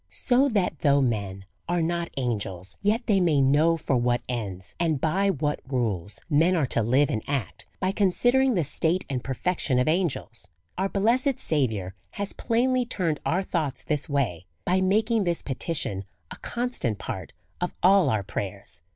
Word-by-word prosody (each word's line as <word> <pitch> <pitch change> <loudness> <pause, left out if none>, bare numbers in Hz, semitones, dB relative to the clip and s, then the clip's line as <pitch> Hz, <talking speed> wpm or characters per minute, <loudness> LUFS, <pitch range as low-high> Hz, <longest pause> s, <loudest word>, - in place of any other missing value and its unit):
So 265 +3 +2
that 195 - 0
though 140 -2 +4
men 100 -7 -1 0.2
are 175 -1 +1
not 170 +1 -1
angels, 100 -8 -2
yet 220 +4 +1
they 205 -4 +3
may 165 -6 +3
know 150 +5 +4
for 145 -3 -1
what 120 0 +1
ends, 100 -7 -5
and 160 -4 +1
by 190 +7 +1
what 150 -4 -1
rules, 105 -7 -1
men 165 +4 +3
are 160 -5 +2
to 120 - +1
live 130 +7 +3
and 110 -5 -1
act, 115 -5 -3
by 185 0 +1
considering 245 +6 +3
the 175 - +2
state 165 +5 0
and 125 -2 -2
perfection 135 0 -1
of 125 - +2
angels. 155 - -1 0.3
Our 190 +1 -1
blessed 240 +7 +2
Saviour 110 - 0 0.2
has 200 0 -4
plainly 250 +2 +1
turned 180 - -2
our 180 +4 +1
thoughts 155 -8 -2
this 150 +1 -2
way, 115 - -1 0.2
by 185 +1 +2
making 215 +3 +2
this 170 -1 -1
petition 130 - -2 0.3
a - - -7
constant 240 - -2
part 100 -4 -6 0.3
of 180 - -2
all 185 -4 +6
our 110 -4 0
prayers. 100 -1 -5
155 Hz, 170 wpm, -26 LUFS, 120-190 Hz, 0.3 s, all